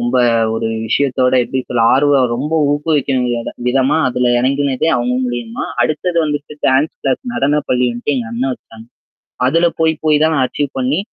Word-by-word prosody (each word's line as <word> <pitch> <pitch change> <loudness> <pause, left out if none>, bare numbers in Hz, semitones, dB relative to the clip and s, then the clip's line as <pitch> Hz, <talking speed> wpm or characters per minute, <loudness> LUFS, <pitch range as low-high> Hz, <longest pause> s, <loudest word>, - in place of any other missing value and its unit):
ரொம்ப 120 +2 0 0.4
ஒரு 115 - -2 0.2
விஷயத்தோட 130 +1 +1
எப்பிடி 130 +2 -3
சொல்ல 120 -2 0
ஆர்வம் 135 -2 +3
ரொம்ப 145 +6 -3 0.2
ஊக்குவிக்கிற 135 -6 -1 0.2
விதமா 130 +4 +2
அதில 125 -1 0
இறங்குனதே 135 +3 0
அவுங்க 125 +1 -1
மூலியமா! 120 -2 -4 0.2
அடுத்தது 155 +7 -1
வந்துட்டு 145 -1 -4
டான்ஸ் 135 +4 +2
கிளாஸ் 135 -2 -1
நடன 145 -2 +1
பள்ளின்டு 125 0 0
எங்க 125 -3 -3
அண்ணன் 130 +3 -1
வச்சுாங்க. 115 -2 -13 0.6
அதுல 165 +6 +3
போய் 160 0 +3
போய் 150 -1 +3
தான் 160 0 +3
நான் 130 -4 +2
அச்சீவ் 145 -2 -3
பண்ணி 130 +5 0
130 Hz, 155 wpm, -16 LUFS, 125-145 Hz, 0.6 s, ஆர்வம்